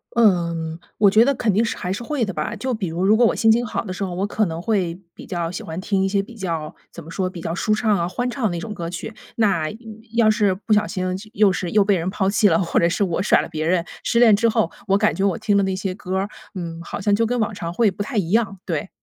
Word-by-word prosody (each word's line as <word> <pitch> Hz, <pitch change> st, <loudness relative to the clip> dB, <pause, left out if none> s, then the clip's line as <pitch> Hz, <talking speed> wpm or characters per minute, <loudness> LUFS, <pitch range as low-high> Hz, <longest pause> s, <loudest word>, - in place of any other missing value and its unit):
嗯， 170 Hz, -7 st, +2 dB, 0.2 s
我 205 Hz, -1 st, +6 dB
觉 220 Hz, +3 st, +6 dB
得 280 Hz, +1 st, +2 dB
肯 220 Hz, -4 st, +1 dB
定 215 Hz, +4 st, +3 dB
是 230 Hz, -, -2 dB
还 180 Hz, -, -3 dB
是 195 Hz, -, -3 dB
会 280 Hz, 0 st, -1 dB
的 195 Hz, -, -4 dB
吧。 155 Hz, +8 st, -3 dB
就 255 Hz, +4 st, -2 dB
比 215 Hz, -5 st, -2 dB
如， 170 Hz, +3 st, -2 dB
如 210 Hz, +2 st, +5 dB
果 240 Hz, -, +5 dB
我 -, -, +2 dB
心 225 Hz, -, +4 dB
情 240 Hz, +2 st, +2 dB
好 215 Hz, -, -3 dB
的 200 Hz, -, -6 dB
时 190 Hz, -, -4 dB
候， 185 Hz, -2 st, -3 dB
我 190 Hz, +2 st, -1 dB
可 210 Hz, +1 st, 0 dB
能 165 Hz, -2 st, -4 dB
会 180 Hz, -4 st, 0 dB, 0.2 s
比 -, -, -11 dB
较 170 Hz, -3 st, -2 dB
喜 180 Hz, -, -5 dB
欢 160 Hz, +2 st, -6 dB
听 195 Hz, 0 st, 0 dB
一 -, -, +2 dB
些 200 Hz, 0 st, +1 dB
比 230 Hz, +4 st, -13 dB
较 165 Hz, -7 st, -4 dB, 0.2 s
怎 170 Hz, -, -10 dB
么 165 Hz, -, -11 dB
说？ 185 Hz, 0 st, -1 dB
比 180 Hz, -2 st, -9 dB
较 165 Hz, -, -3 dB
舒 215 Hz, +4 st, +1 dB
畅 215 Hz, -1 st, +2 dB
啊， 170 Hz, -1 st, 0 dB
欢 245 Hz, +7 st, -2 dB
畅 255 Hz, 0 st, -5 dB
的 -, -, +3 dB
那 175 Hz, -, -3 dB
种 215 Hz, +4 st, -6 dB
歌 170 Hz, -4 st, -5 dB
曲。 175 Hz, +5 st, -6 dB, 0.2 s
那 195 Hz, -8 st, +2 dB, 0.5 s
要 225 Hz, -2 st, +5 dB
是 210 Hz, -3 st, +2 dB
不 215 Hz, +3 st, -1 dB
小 210 Hz, 0 st, +3 dB
心 185 Hz, -3 st, -3 dB, 0.3 s
又 210 Hz, -3 st, +4 dB
是 180 Hz, -1 st, -3 dB
又 210 Hz, -1 st, +4 dB
被 200 Hz, 0 st, +3 dB
人 170 Hz, +2 st, -2 dB
抛 190 Hz, 0 st, 0 dB
弃 210 Hz, +1 st, +4 dB
了， 165 Hz, -4 st, +4 dB
或 175 Hz, -2 st, +1 dB
者 170 Hz, -, +4 dB
是 180 Hz, +4 st, 0 dB
我 180 Hz, -2 st, 0 dB
甩 200 Hz, -, +4 dB
了 -, -, -7 dB
别 155 Hz, -2 st, -3 dB
人， 170 Hz, -1 st, +1 dB, 0.2 s
失 235 Hz, -, +2 dB
恋 230 Hz, -3 st, +7 dB
之 230 Hz, +3 st, +2 dB
后， 170 Hz, -6 st, +1 dB, 0.2 s
我 195 Hz, 0 st, +4 dB
感 215 Hz, +1 st, +2 dB
觉 195 Hz, -, -2 dB
我 195 Hz, -4 st, +1 dB
听 205 Hz, -, +1 dB
的 200 Hz, -, +3 dB
那 190 Hz, -1 st, -1 dB
些 190 Hz, 0 st, -3 dB
歌 185 Hz, 0 st, -4 dB
儿， 195 Hz, +2 st, -1 dB, 0.3 s
嗯， 170 Hz, -2 st, -5 dB
好 -, -, -6 dB
像 205 Hz, +1 st, +2 dB
就 225 Hz, +3 st, +3 dB
跟 245 Hz, +2 st, -1 dB
往 220 Hz, 0 st, 0 dB
常 170 Hz, -3 st, -5 dB
会 215 Hz, +1 st, +3 dB
不 190 Hz, -, -7 dB
太 225 Hz, +5 st, -4 dB
一 180 Hz, -5 st, 0 dB
样， 210 Hz, -3 st, +1 dB
对。 165 Hz, +2 st, -3 dB
195 Hz, 320 characters per minute, -22 LUFS, 175-215 Hz, 0.5 s, 恋